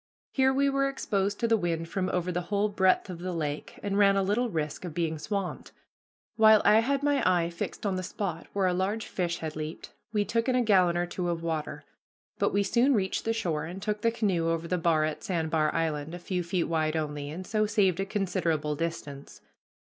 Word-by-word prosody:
Here 265 Hz, -1 st, +3 dB
we 275 Hz, +1 st, +2 dB
were 275 Hz, 0 st, +2 dB
exposed 200 Hz, -6 st, -1 dB
to 230 Hz, -, +2 dB
the 225 Hz, -, +4 dB
wind 170 Hz, -4 st, -1 dB
from 185 Hz, +2 st, -2 dB
over 180 Hz, 0 st, -1 dB
the 180 Hz, 0 st, -1 dB
whole 205 Hz, +1 st, +1 dB
breadth 190 Hz, -2 st, +2 dB
of 180 Hz, -3 st, -7 dB
the 180 Hz, +1 st, -4 dB
lake, 150 Hz, -3 st, -4 dB
and 200 Hz, 0 st, 0 dB
ran 200 Hz, -1 st, +5 dB
a 195 Hz, -, +2 dB
little 225 Hz, +6 st, +1 dB
risk 155 Hz, -4 st, -3 dB
of 170 Hz, -4 st, -6 dB
being 160 Hz, -2 st, -1 dB
swamped. 195 Hz, +2 st, -4 dB, 0.6 s
While 220 Hz, -1 st, +7 dB
I 215 Hz, -, +7 dB
had 275 Hz, +4 st, 0 dB
my 285 Hz, -1 st, +2 dB
eye 175 Hz, -2 st, +2 dB
fixed 170 Hz, +6 st, -5 dB
on 195 Hz, -2 st, 0 dB
the -, -, -2 dB
spot 180 Hz, -2 st, -4 dB
where 195 Hz, -1 st, 0 dB
a 180 Hz, -, +2 dB
large 200 Hz, +4 st, -1 dB
fish 175 Hz, -2 st, -2 dB
had 160 Hz, -2 st, -5 dB
leaped, 155 Hz, +1 st, -6 dB, 0.2 s
we 210 Hz, -2 st, +1 dB
took 230 Hz, +4 st, 0 dB
in 255 Hz, -, +2 dB
a 250 Hz, -, +3 dB
gallon 185 Hz, -5 st, +4 dB
or 175 Hz, -, +1 dB
two 175 Hz, 0 st, -3 dB
of 170 Hz, -1 st, -2 dB
water; 160 Hz, -2 st, -3 dB, 0.6 s
but -, -, +2 dB
we 200 Hz, 0 st, +2 dB
soon 245 Hz, +7 st, +3 dB
reached 190 Hz, -3 st, -1 dB
the 225 Hz, -, +1 dB
shore 165 Hz, -9 st, -1 dB
and 175 Hz, +4 st, -7 dB
took 210 Hz, +1 st, -2 dB
the 230 Hz, -, +3 dB
canoe 190 Hz, -8 st, 0 dB
over 165 Hz, 0 st, -1 dB
the 180 Hz, +1 st, 0 dB
bar 160 Hz, -2 st, +3 dB
at 155 Hz, -1 st, -4 dB
Sand 165 Hz, -4 st, -2 dB
bar 155 Hz, -2 st, +2 dB
Island, 160 Hz, -1 st, -2 dB
a -, -, -5 dB
few 180 Hz, +1 st, -3 dB
feet 175 Hz, 0 st, -1 dB
wide 155 Hz, -1 st, 0 dB
only, 150 Hz, -2 st, -3 dB
and 175 Hz, +5 st, -6 dB
so 215 Hz, 0 st, +1 dB
saved 195 Hz, -4 st, +2 dB
a 195 Hz, -, 0 dB
considerable 175 Hz, -7 st, -1 dB
distance. 145 Hz, -3 st, -5 dB
185 Hz, 225 wpm, -28 LUFS, 165-210 Hz, 0.6 s, While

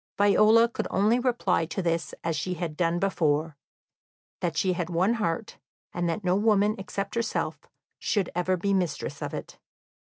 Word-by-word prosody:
Viola 215 Hz, +3 st, +5 dB
could 235 Hz, -, -4 dB
only 215 Hz, +5 st, +3 dB
reply 235 Hz, -9 st, +1 dB
to 170 Hz, -, -5 dB
this 170 Hz, -2 st, -1 dB
as 165 Hz, -1 st, -1 dB
she 180 Hz, +5 st, -2 dB
had 165 Hz, -2 st, -4 dB
done 170 Hz, 0 st, +1 dB
before, 160 Hz, -5 st, 0 dB, 0.8 s
that 165 Hz, -3 st, -2 dB
she 185 Hz, +3 st, +2 dB
had 175 Hz, -1 st, -3 dB
one 180 Hz, +6 st, +2 dB
heart, 215 Hz, -1 st, -2 dB, 0.3 s
and 175 Hz, -1 st, -1 dB
that 170 Hz, +5 st, -3 dB
no 180 Hz, 0 st, +2 dB
woman 210 Hz, 0 st, +3 dB
except 195 Hz, +1 st, -4 dB
herself 230 Hz, -1 st, -2 dB, 0.4 s
should 200 Hz, -5 st, 0 dB
ever 180 Hz, +1 st, 0 dB
be 200 Hz, +3 st, 0 dB
mistress 180 Hz, -4 st, -2 dB
of -, -, -3 dB
it. -, -, -7 dB
185 Hz, 165 wpm, -27 LUFS, 170-210 Hz, 0.8 s, Viola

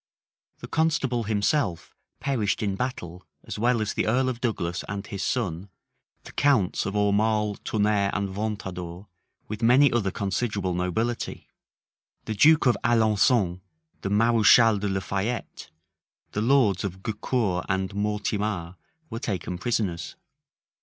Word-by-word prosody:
The -, -, -7 dB
constable 140 Hz, -7 st, 0 dB
himself 105 Hz, -, 0 dB, 0.2 s
perished 115 Hz, -8 st, -1 dB
in 100 Hz, -2 st, -1 dB
battle 90 Hz, -7 st, -5 dB, 0.2 s
as -, -, -6 dB
well 120 Hz, 0 st, +2 dB
as 105 Hz, -, -3 dB
the -, -, -1 dB
earl 130 Hz, +4 st, +2 dB
of 120 Hz, -2 st, -5 dB
Douglas 90 Hz, -8 st, -2 dB
and 100 Hz, 0 st, -4 dB
his 100 Hz, -2 st, -6 dB
son, 95 Hz, -5 st, -2 dB, 0.5 s
the -, -, -11 dB
counts 120 Hz, -11 st, +2 dB
of 100 Hz, -, -4 dB
Aumale, 105 Hz, 0 st, +1 dB
Tonnerre, 105 Hz, -2 st, +1 dB
and 100 Hz, -1 st, -1 dB
Ventadour, 95 Hz, -3 st, -5 dB, 0.4 s
with 105 Hz, +1 st, -6 dB
many 125 Hz, +4 st, +5 dB
other 115 Hz, -5 st, +1 dB
considerable 100 Hz, 0 st, -2 dB
nobility. 100 Hz, +7 st, -2 dB, 0.8 s
The 110 Hz, -, -3 dB
duke 150 Hz, +9 st, +5 dB
of 125 Hz, -, +4 dB
Alençon, 110 Hz, -4 st, +2 dB, 0.4 s
the 100 Hz, -, -3 dB
mareschal 115 Hz, 0 st, +5 dB
de 100 Hz, 0 st, -2 dB
la 95 Hz, 0 st, -1 dB
Fayette, 100 Hz, +7 st, -4 dB, 0.6 s
the 105 Hz, -, -2 dB
lords 115 Hz, -6 st, +3 dB
of 95 Hz, -1 st, -5 dB
Gaucour 110 Hz, -4 st, -1 dB
and 95 Hz, 0 st, -1 dB
Mortemar, 105 Hz, -3 st, -2 dB, 0.3 s
were 115 Hz, -, -4 dB
taken 90 Hz, -5 st, -4 dB
prisoners. 95 Hz, -6 st, -2 dB
105 Hz, 135 wpm, -26 LUFS, 95-115 Hz, 0.8 s, many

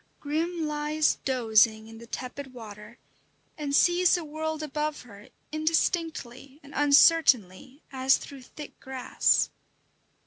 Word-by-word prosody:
Grim 320 Hz, +3 st, -2 dB
lies 300 Hz, 0 st, 0 dB
dozing 220 Hz, -4 st, +2 dB
in 225 Hz, 0 st, -12 dB
the 235 Hz, -, -13 dB
tepid 255 Hz, +2 st, -7 dB
water, 210 Hz, 0 st, -11 dB, 0.6 s
and 285 Hz, -2 st, -2 dB
sees 350 Hz, +2 st, +4 dB
the 345 Hz, -2 st, -4 dB
world 310 Hz, +1 st, -4 dB
above 300 Hz, 0 st, -3 dB
her 210 Hz, -1 st, -15 dB, 0.2 s
indistinctly 310 Hz, -4 st, -2 dB
and 285 Hz, 0 st, -14 dB
uncertainly 280 Hz, -, +3 dB
as 260 Hz, 0 st, +3 dB
through 275 Hz, -2 st, -11 dB
thick 295 Hz, +4 st, -12 dB
grass. 265 Hz, -1 st, 0 dB
280 Hz, 115 wpm, -27 LUFS, 245-310 Hz, 0.6 s, sees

